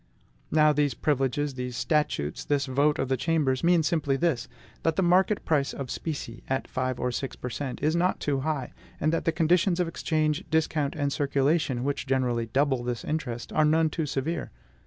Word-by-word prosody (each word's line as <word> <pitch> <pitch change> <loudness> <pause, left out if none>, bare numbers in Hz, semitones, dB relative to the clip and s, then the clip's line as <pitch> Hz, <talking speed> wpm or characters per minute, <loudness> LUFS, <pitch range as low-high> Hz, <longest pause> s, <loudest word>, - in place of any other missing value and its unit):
Now 155 -1 +4
these 145 -4 +1
privileges, 140 +1 0
these 125 -1 -5
statutes, 150 - 0
this 140 -2 0
vote 140 +3 +2
of 135 - -1
the 135 - +1
Chambers, 145 -3 +1
mean 170 -1 +4
simply 150 -4 +1
this, 145 -5 0 0.3
that 165 -1 +1
the 190 - +2
market 185 +4 +3
price 145 -4 +1
of 135 -2 -5
specie, 140 -7 -5
at 135 0 -1
five 130 -1 -2
or 125 - 0
six 130 +2 -4
per 125 - -6
cent., 135 0 -5
is 155 +2 +2
not 180 +2 +1
too 140 -2 0
high, 140 -2 -2 0.3
and 155 +2 +1
that 165 - -1
the 165 - +3
conditions 170 +3 +2
of 180 - +1
exchange, 155 0 0
discount, 155 -2 0
and 145 -2 -1
circulation, 140 -2 +1
which 140 0 -2
generally 125 -3 0
double 135 +1 +1
this 120 -1 -3
interest, 125 -7 -3
are - - +3
none 160 +1 +3
too 160 -2 -2
severe. 155 +5 -2
145 Hz, 190 wpm, -27 LUFS, 130-160 Hz, 0.3 s, Now